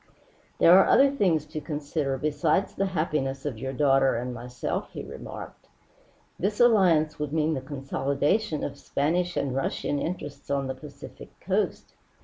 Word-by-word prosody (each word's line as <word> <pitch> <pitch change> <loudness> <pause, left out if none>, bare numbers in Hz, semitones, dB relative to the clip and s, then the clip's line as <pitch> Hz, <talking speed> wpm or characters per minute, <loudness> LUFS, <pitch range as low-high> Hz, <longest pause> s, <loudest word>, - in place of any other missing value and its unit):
"There 180 +3 +7
are - - +5
other 275 0 +6
things 180 - +1
to 155 0 -6
consider 145 -2 -2
besides 150 +6 0
the 195 - 0
happiness 150 -6 -2
of 130 -7 -3
your 130 +2 -3
daughter 135 -1 +3
and 125 +2 -3
myself," 125 +1 -4
he - - -6
remarked. - - -9 0.7
"This 205 +3 -1
alliance 180 -11 +4
would 150 -1 -3
mean 160 0 +1
the 135 - -3
consolidation 140 +6 -1
of 140 0 -5
Spanish 175 +5 -1
and 135 -2 -1
Russian 140 +1 -1
interests 145 -4 -5
on 140 -1 0
the 130 - -3
Pacific 140 - -12
coast. - - -2
150 Hz, 150 wpm, -26 LUFS, 135-165 Hz, 0.7 s, There